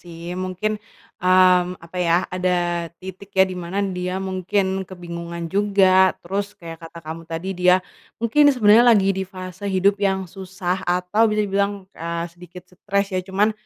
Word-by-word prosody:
sih, 170 0 -8
mungkin, 210 +3 -2 0.4
mmm, 180 0 +4
apa 170 +2 -12
ya, 170 -1 +2 0.2
ada 175 -2 0
titik 190 +1 -9
ya, 190 - +7
di 185 - -6
mana 175 +3 -6 0.2
dia 180 +1 -2
mungkin 190 0 -1
kebingungan 170 -2 -7
juga, 190 -2 +4
terus 200 +3 -4
kayak 165 -3 -10
kata 165 +1 -10
kamu 160 +1 -6
tadi 165 +3 -4
dia, 180 0 +6 0.4
mungkin 290 +6 +4
sebenarnya 235 -2 +6
lagi 195 0 +2
di 190 0 -3
fase 185 +1 -7
hidup 195 +1 +2
yang 190 -1 +1
susah 185 0 -4
atau 180 +5 +2
bisa 210 0 +1
dibilang, 200 0 -1
eee, 170 +1 -4
sedikit 180 0 -13
stres 200 +1 -2
ya. 185 - 0
Cuman, 205 +3 +2
185 Hz, 160 wpm, -22 LUFS, 175-200 Hz, 0.4 s, ya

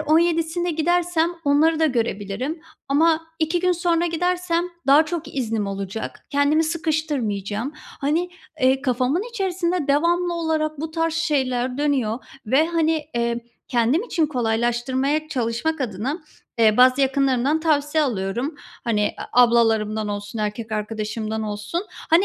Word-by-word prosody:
17'sinde 330 +2 +2
gidersem 340 +1 +1
onları 310 +3 +3
da 320 - +5
görebilirim 235 - -2 0.3
ama 320 +3 +3
2 320 +2 +1
gün 365 0 +3
sonra 345 -1 +1
gidersem 350 0 0 0.2
daha 285 +3 +6
çok 335 -3 -5
iznim 225 -5 -1
olacak, 195 +2 -5
kendimi 285 +3 +3
sıkıştırmayacağım." 285 - -2
Hani, 310 +4 -2 0.3
eee, 265 +1 +3
kafamın 260 +6 +1
içerisinde 365 - -1
devamlı 345 +4 +2
olarak 310 -2 -1
bu 320 0 -4
tarz 325 0 -1
şeyler 260 -5 0
dönüyor 260 -6 +1 0.3
ve, 270 +8 +3
hani, 325 -2 +1
eee, 235 0 0 0.3
kendim 245 - +2
için 340 -9 0
kolaylaştırmaya 255 +4 0
çalışmak 255 +5 -1
adına, 250 - -2 0.4
eee, 215 -2 +5
bazı 255 +2 +6
yakınlarımdan 270 +2 +2
tavsiye 305 -1 +2
alıyorum, 235 +4 -2 0.3
hani, 210 -3 +1 0.2
a 250 - +7
ablalarımdan 220 -3 +2
olsun, 205 +2 -5
erkek 215 +1 -3
arkadaşımdan 215 +1 -3
olsun. 210 - -3
Hani, 340 +2 +2
285 Hz, 125 wpm, -22 LUFS, 235-325 Hz, 0.4 s, a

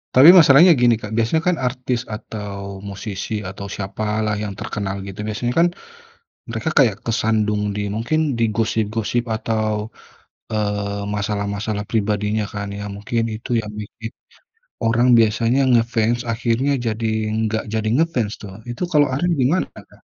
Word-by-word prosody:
Tapi 135 +6 +9
masalahnya 170 -1 +8
gini 120 -1 +5
Kak, 105 - -7
biasanya 115 +8 +1
kan 180 -2 +3
artis 125 -1 -2
atau 100 -3 -6
musisi 100 +1 -5
atau 95 +1 -7
siapalah 105 +2 -2
yang 100 -2 -5
terkenal 100 -2 -3
gitu 95 +1 -9
biasanya 120 +3 -2
kan, 170 - +6 0.8
mereka 115 +7 -2
kayak 110 -7 +4
kesandung 105 -2 +1
di 105 0 -2
mungkin 150 +6 0
di 115 -1 +2
gosip-gosip 110 +1 -1
atau, 110 -1 -1 0.7
eee, 100 -1 -1
masalah-masalah 105 0 -2
pribadinya 105 -1 0
kan 105 -1 -4
ya 105 - -5
mungkin 115 +3 -1
itu 110 +3 -9
yang 105 -1 -8
bikin, 110 +2 -8 0.7
orang 115 +2 +3
biasanya 115 +4 +3
ngefans 115 0 +2
akhirnya 120 +4 0
jadi 110 +1 -1 0.4
nggak 110 0 -2
jadi 110 -1 0
ngefans 130 -9 +1
tuh. 100 -2 -8 0.2
Itu 120 - -6
kalo 150 -2 +5
Ariel 175 +6 +1
gimana 145 +9 +2
Kak? - - -16
110 Hz, 140 wpm, -21 LUFS, 105-120 Hz, 0.8 s, Tapi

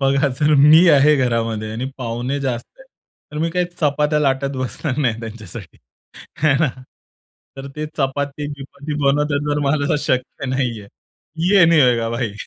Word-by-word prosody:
बघा 140 +1 +2
जर 150 +1 +4
मी 155 +5 +7
आहे 150 0 +5
घरामध्ये 115 -4 -1
आणि 125 +4 -4
पाहुणे 125 +3 -3
जास्त 125 -3 -3
आहे. - - -14 0.5
तर 150 - -5
मी 165 - 0
काही 180 +1 0 0.2
चपात्या 150 0 +1
लाटत 135 -1 0
बसणार 130 +2 -4
नाही 120 -6 0
त्यांच्यासाठी 110 -5 -10 0.7
आहे 155 - +5
ना. 165 - +3 0.9
तर 135 0 -7
ते 155 - -3
चपाती-बिपाती 145 +1 -4
बनवतात 145 +1 +1
तर 145 - 0
मला 145 +1 +1
शक्य 130 -2 -2
नाहीये. 125 -5 -2 0.6
ये 195 -2 +6
नहीं 165 -1 +4
होएगा 120 -3 +2
भाई. 115 -2 -2
140 Hz, 150 wpm, -19 LUFS, 125-150 Hz, 0.9 s, मी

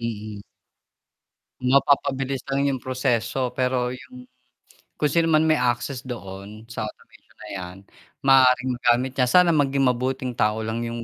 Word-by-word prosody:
Mm. 110 -3 -5 1.2
Mapapabilis 135 0 +1
lang 140 +1 0
yung 130 - -2
proseso 125 -1 -1
pero 125 -1 -1
yung, 125 0 -11 0.7
kung 150 -2 0
sino 165 +1 +2
man 155 -1 +4
may 155 -3 +2
access 125 +2 -1
doon 105 -2 -8
sa 110 -3 -4
automation - - -16
na - - -9
yan, 90 -1 -7 0.5
maaaring 130 -1 +5
magamit 125 +1 +2
niya. 125 - +3
Sana 180 +5 +5
maging 140 -3 +1
mabuting 130 +1 -3
tao 110 -1 0
lang 110 +1 -3
yung 115 0 -5
125 Hz, 140 wpm, -23 LUFS, 115-135 Hz, 1.2 s, maaaring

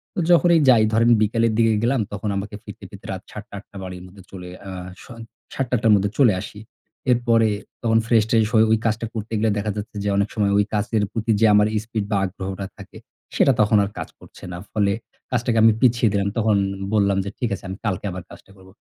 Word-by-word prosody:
তো - - -2
যখনই 170 -1 +5
যাই 115 -3 +6
ধরেন 115 +1 +4
বিকালের 115 +1 +1
দিকে 115 -1 +3
গেলাম 125 +1 +2
তখন 105 +1 -3
আমাকে 105 +1 -5
ফিরতে - - -11
ফিরতে - - -13
রাত - - -5
৭ - - -8
টা - - -10
৮ - - -17
টা 100 - -11
বাড়ির 90 -1 -8
মধ্যে 95 0 -15
চলে 90 -2 -9 0.2
আ - - -6 0.3
স - - -15 0.5
৭ 135 - -1
টা - - -6
৮ 110 - -1
টার 110 - +5
মধ্যে 100 0 +1
চলে 120 -7 +5
আসি। 105 - -9 0.5
এরপরে 115 -2 +3 0.3
তখন 115 -1 +3
ফ্রেশ-ট্রেশ 110 -1 +3
হয়ে 110 0 +5
ওই 110 - +4
কাজটা 115 +1 0
করতে 110 0 -6
গেলে 110 -1 +2
দেখা 105 +1 -2
যাচ্ছে 105 +1 -7
যে 100 - -1
অনেক 100 +1 +1
সময় 100 -2 +1
ওই 105 - +3
কাজের 105 0 0
প্রতি 115 +1 -1
যে - - +6
আমার 105 0 +5 0.2
স্পিড 110 -3 -3
বা 100 - +2
আগ্রহটা 95 +1 -5
থাকে - - -12 0.4
সেটা 135 - +4
তখন 105 0 +3
আর 100 - -3
কাজ - - -5
করছে - - -16
না। 90 - -6
ফলে 100 -2 +1 0.4
কাজটাকে 120 -2 0
আমি 115 - +7
পিছিয়ে 120 -3 +3
দিলাম। 100 0 0
তখন 110 -2 +2 0.4
বললাম 100 -2 +2
যে, - - -3
"ঠিক 120 - -1
আছে, - - -14
আমি 95 - -6
কালকে 105 0 -2
আবার 90 -1 -7
কাজটা - - -15
করব।" 95 0 -17
110 Hz, 225 wpm, -22 LUFS, 100-115 Hz, 0.5 s, আমি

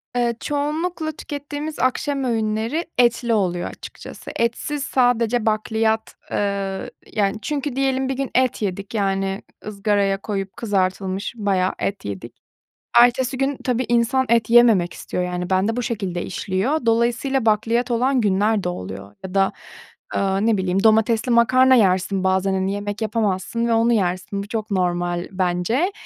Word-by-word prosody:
Eee, 240 -1 +1
çoğunlukla 310 +3 -2
tükettiğimiz 290 +1 -6
akşam 270 +2 0
öğünleri 225 +5 -1
etli 240 -1 +3
oluyor 180 -5 0
açıkçası. - - -10
Etsiz 255 +5 -1
sadece 245 -3 +2
bakliyat. 220 0 0 0.2
Eee, 200 +3 -2 0.2
yani, 205 -2 +1
çünkü 290 -1 -3
diyelim 265 -1 0
bir - - 0
gün 270 0 -3
et 255 -2 +2
yedik, 200 0 -3
yani 195 -2 -1 0.3
ızgaraya 200 -1 +1
koyup 195 -2 -4
kızartılmış 195 -1 -1
bayağı 190 -3 +1
et 200 0 -3
yedik. 100 -2 -6 0.6
Ertesi 250 +2 +4
gün 275 +1 0
tabii, 250 0 0
insan 240 +2 +2
et 230 -1 +2
yememek 225 -7 +5
istiyor, 180 - -4
yani, 180 0 -3
bende 195 +5 +1
bu 245 - -1
şekilde 195 -7 -3
işliyor. 200 - -2
Dolayısıyla, 235 +3 +1
bakliyat 230 +3 +2
olan 255 +3 +2
günler 205 0 +2
de - - 0
oluyor 95 - -7
ya 190 0 -7
da, 195 -1 +3 0.6
eee, 195 +2 +1
ne 225 -2 +3
bileyim, 190 0 0
domatesli 220 +2 +3
makarna 255 +3 +5
yersin 190 -3 +2
bazen, 190 +1 +2
hani, 190 +1 0
yemek 205 +1 -4
yapamazsın 215 +1 -1
ve 235 - +1
onu 230 +1 +3
yersin. 190 -1 -1
Bu 200 - -10
çok 220 -1 -4
normal 175 -2 -1
bence 185 - 0
220 Hz, 145 wpm, -21 LUFS, 195-245 Hz, 0.6 s, yememek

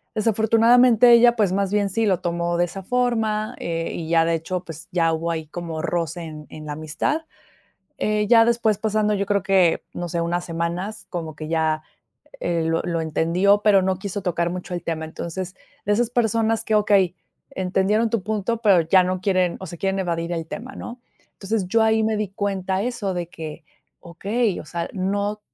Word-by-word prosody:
desafortunadamente, 230 +2 +5
ella 235 0 +6
pues, 205 -4 +2
más 195 0 0
bien 205 -1 +2
sí 225 +3 0
lo 185 -4 +2
tomó 170 0 -1
de 175 - +3
esa 195 +2 -8
forma, 225 -1 0
eh, 165 0 -3
y 165 -1 -5
ya, 165 -1 +4
de 165 0 +1
hecho, 175 +3 -3
pues, 165 0 -10
ya 165 -2 +2
hubo 165 +1 -1
ahí 160 -1 -4
como 165 -1 -5
roce 170 0 -2
en 155 -1 -8
en 155 0 -10
la 150 - -4
amistad. 155 - -2 0.8
Eh, 210 0 0
ya 230 -1 +7
después 225 -3 +2
pasando 215 -1 +1
yo 200 0 0
creo 200 -2 +1
que, 190 -4 +3
no 175 0 -4
sé, 170 0 -2
unas 175 +1 -1
semanas 170 +5 -4
como 160 -4 -5
que 155 +1 -7
ya, 160 -1 0 0.6
eh, 170 -1 0
lo 165 0 0
lo 170 -1 -1
entendió, 175 +6 +2
pero 200 -3 +5
no 190 0 0
quiso 200 0 -4
tocar 170 -1 0
mucho 180 0 -6
el 175 - -4
tema. 160 -1 -3
Entonces 175 +3 -6 0.3
de 205 - +2
esas 235 +2 +1
personas 225 -2 +1
que, 220 - +1
okey, 200 -4 +3 0.4
entendieron 195 +4 +1
tu 230 -4 0
punto, 220 +2 -2
pero 195 -6 +5
ya 185 +3 +4
no 185 0 -2
quieren, 185 -3 +1
o - - -5
sea, 170 - -8
quieren 195 +1 -1
evadir 170 -2 -2
el 165 -1 -3
tema, 245 +10 -7
¿no? 245 +1 -8 0.3
Entonces 195 -1 -2
yo 225 +3 +3
ahí 220 0 +3
me 220 -1 +1
di 210 -1 -1
cuenta 195 -2 -2
eso 235 -6 -2
de 175 -1 -4
que, 160 -1 -8 0.4
okey, 200 +5 -1
o - - -9
sea, 170 +1 -4
no 200 +2 -1
190 Hz, 195 wpm, -23 LUFS, 170-215 Hz, 0.8 s, ya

